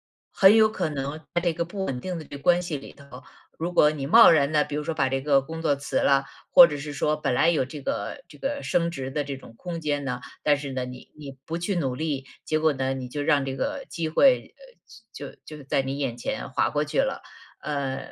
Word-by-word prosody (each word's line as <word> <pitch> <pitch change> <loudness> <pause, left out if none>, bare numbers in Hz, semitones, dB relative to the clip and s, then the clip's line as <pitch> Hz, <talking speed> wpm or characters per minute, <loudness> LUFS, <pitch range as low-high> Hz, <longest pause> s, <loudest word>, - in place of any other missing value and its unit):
作。 - - -
很 195 +2 +6
有 220 -1 +6
可 185 -5 -2
能 140 +1 -4 0.2
在 175 - +2
这 175 -1 +1
个 170 - -2
不 190 +3 -5
稳 130 -6 -3
定 180 +2 -4
的 - - -8
这 140 - -9
个 140 - -17
关 175 +2 +4
系 175 -3 -4
里 135 - -11
头， 130 -3 -13 0.3
如 170 +2 -3
果 150 - +5
你 145 -3 -5
贸 230 +9 +8
然 145 -3 +3
地， 150 -1 +3
比 150 - -5
如 150 - -2
说 165 - -2
把 140 -4 +1
这 135 0 -1
个 140 -1 +3
工 160 +4 -7
作 150 -3 +2
辞 140 - -3
了， 140 0 +3 0.3
或 175 - +10
者 150 - -5
是 145 +1 -6
说 150 +2 0
本 150 - -1
来 160 +6 +3
有 160 -5 +2
这 145 +3 -9
个 - - -4
这 - - -14
个 280 +1 -3
升 170 -1 0
职 135 -5 -5
的 145 +1 -1
这 140 -1 -6
种 115 -3 -15
空 175 +2 -6
间 145 -2 -1
呢， 125 -2 -3 0.2
但 145 -1 +3
是 140 -1 -6
呢， 130 -1 -2
你 125 0 -11
你 140 -3 -10
不 165 - -3
去 180 +3 -2
努 135 -6 -1
力， 145 -3 -3 0.2
结 155 - 0
果 155 -1 +2
呢， 135 0 -1
你 130 -1 -5
就 145 +3 -3
让 145 -1 +2
这 135 -1 -4
个 285 -1 -3
机 165 -2 -3
会， 255 - +3
呃， - - -16 0.5
就 - - -8
就 150 -2 -10
在 135 0 0
你 135 +1 -4
眼 135 -5 -3
前 270 - -4
划 - - +1
过 - - 0
去 - - -2
了。 - - -1 0.4
呃， 140 -3 -3
150 Hz, 280 characters per minute, -25 LUFS, 135-170 Hz, 0.5 s, 或